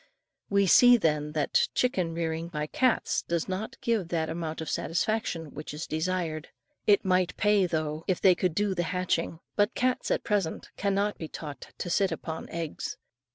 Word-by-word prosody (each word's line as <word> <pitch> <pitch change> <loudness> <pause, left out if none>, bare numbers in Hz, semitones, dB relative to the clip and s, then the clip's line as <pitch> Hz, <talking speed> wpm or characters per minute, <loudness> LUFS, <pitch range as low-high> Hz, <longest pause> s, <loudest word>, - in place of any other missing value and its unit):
We 200 0 +3
see, 245 +6 +7
then, 150 -6 0
that 155 -2 +2
chicken 185 -10 +1
rearing 165 0 -2
by 150 -3 -3
cats 255 +10 +1
does 170 -2 -2
not 190 +4 -4
give 225 -7 0
that 165 -2 -1
amount 160 -1 -4
of 160 - -5
satisfaction 170 -4 -1
which 150 0 -7
is 155 - -4
desired. 160 -1 -2 0.4
It 205 -2 +5
might 185 -1 +2
pay, 210 -3 +3
though, 155 -1 -2
if 185 - +1
they 190 - +6
could 180 -2 -1
do 205 0 +1
the 175 - -1
hatching; 170 -1 -1
but 205 +3 +2
cats 255 0 0
at - - +1
present 200 -6 -1
cannot 200 +1 0
be 160 - -4
taught 150 -2 -8
to 175 - -4
sit 195 0 +2
upon 160 0 -5
eggs. 165 -2 -4
175 Hz, 175 wpm, -28 LUFS, 160-200 Hz, 0.4 s, see